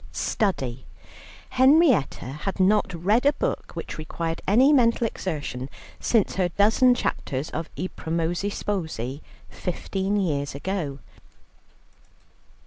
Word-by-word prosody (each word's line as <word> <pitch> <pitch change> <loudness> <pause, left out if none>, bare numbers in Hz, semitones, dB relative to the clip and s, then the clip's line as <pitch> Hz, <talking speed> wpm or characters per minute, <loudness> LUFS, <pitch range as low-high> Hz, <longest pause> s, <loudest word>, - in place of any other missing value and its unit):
Study. 130 - -1 0.6
Henrietta 265 - +4 0.2
had 195 - -6
not 195 +1 +3
read 195 +8 +1
a 285 +1 +4
book - - -3
which - - -6
required 165 +1 -4
any 255 +9 +5
mental 235 -3 +3
exertion 145 - -4 0.3
since 225 -5 +1
her 180 -2 +2
dozen 225 +7 +4
chapters 140 - -3
of 165 - -4
"I 185 - -2
Promessi 170 +4 -1
Sposi," 160 - -3 0.3
fifteen 190 +2 -2
years 145 -7 -1
ago. 150 -3 -3
185 Hz, 110 wpm, -25 LUFS, 155-220 Hz, 0.6 s, any